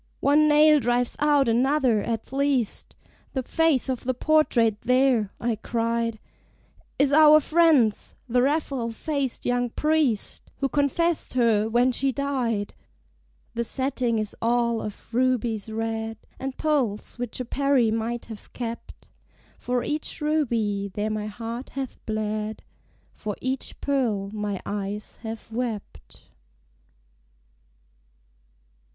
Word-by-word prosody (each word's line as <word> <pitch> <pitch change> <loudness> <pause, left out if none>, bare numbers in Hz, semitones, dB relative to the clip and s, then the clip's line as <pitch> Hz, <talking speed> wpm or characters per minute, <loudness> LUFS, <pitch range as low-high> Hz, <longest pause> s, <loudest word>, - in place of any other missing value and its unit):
"One 300 +2 +4
nail 300 0 +6
drives 245 0 0
out 290 -3 +3
another, 250 -1 +2
at 230 +3 -4
least! 275 -5 0 0.4
The 260 - -1
face 320 -1 +2
of 260 -2 -2
the 255 0 -1
portrait 240 -8 +2
there," 250 -4 +2
I 230 -2 -1
cried, 230 0 -1 0.8
"Is 280 0 +3
our 305 0 +8
friend's, 305 -9 +3
the 245 +1 +2
Raphael 275 -3 0
faced 275 +2 -3
young 245 0 +1
Priest, 300 -5 0
Who 275 - -1
confessed 295 +3 0
her 225 -3 +3
when 240 +3 +3
she 270 +2 +1
died." 250 -6 -2 0.8
The 235 0 -1
setting 255 -1 0
is 215 -1 -2
all 235 0 +1
of 210 +2 -9
rubies 235 -4 0
red, 225 0 -3 0.2
And 265 0 -5
pearls 255 -8 -1
which 245 -1 -4
a 255 - -3
Peri 270 -3 +2
might 230 +2 -2
have 220 -2 -11
kept. 235 -1 -7 0.5
For 245 -1 -1
each 300 +1 -2
ruby 230 -10 0
there 210 +3 -2
my 215 0 -3
heart 230 +4 -6
hath 265 -2 -5
bled: 215 0 -3 0.5
For 210 -1 -5
each 260 +1 -3
pearl 225 -8 0
my 210 -2 -3
eyes 205 +1 -4
have 225 0 -7
wept. 215 - -6
240 Hz, 120 wpm, -25 LUFS, 220-275 Hz, 0.8 s, our